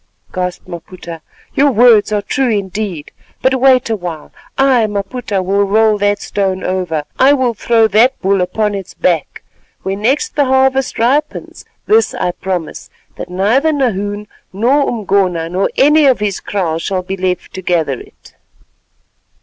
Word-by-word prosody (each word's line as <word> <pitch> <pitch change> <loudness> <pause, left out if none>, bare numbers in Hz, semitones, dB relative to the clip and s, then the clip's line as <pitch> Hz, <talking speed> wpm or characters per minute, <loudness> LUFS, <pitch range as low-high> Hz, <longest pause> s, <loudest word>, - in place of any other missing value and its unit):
gasped 180 -1 -4
Maputa; 170 -1 -9 0.3
"your 285 +1 +3
words 230 -2 +5
are 205 -1 0
true 265 +4 0
indeed. 200 -5 -3 0.3
But 260 -1 +2
wait 260 -2 +4
a 225 - 0
while. 175 -6 -7 0.3
I, 260 -5 +3
Maputa, 205 0 -3
will 200 +2 +1
roll 215 +1 +2
that 205 0 0
stone 190 -2 -2
over, 180 -5 -2 0.2
I 270 +2 +6
will 255 -4 +1
throw 225 +1 +2
that 235 +6 +3
bull 195 0 +1
upon 210 +3 -1
its 195 -2 -7
back. 170 -4 -1 0.4
When 195 +1 -3
next 280 - 0
the 290 -2 +2
harvest 265 0 +1
ripens, 260 +6 -1 0.2
this 445 +2 +2
I 180 - -1
promise, 180 -3 -5 0.3
that - - -7
neither 220 - +1
Nahoon 205 -7 -2 0.3
nor 255 +9 +1
Umgona, 190 -6 0
nor 185 +3 0
any 300 +1 +5
of 260 -4 +3
his 205 -2 -2
kraal 170 -5 -2
shall 185 +2 -2
be 190 +1 -4
left 185 -1 -3
to 190 - -6
gather 165 -7 -1
it." - - -17
205 Hz, 155 wpm, -15 LUFS, 185-250 Hz, 0.4 s, I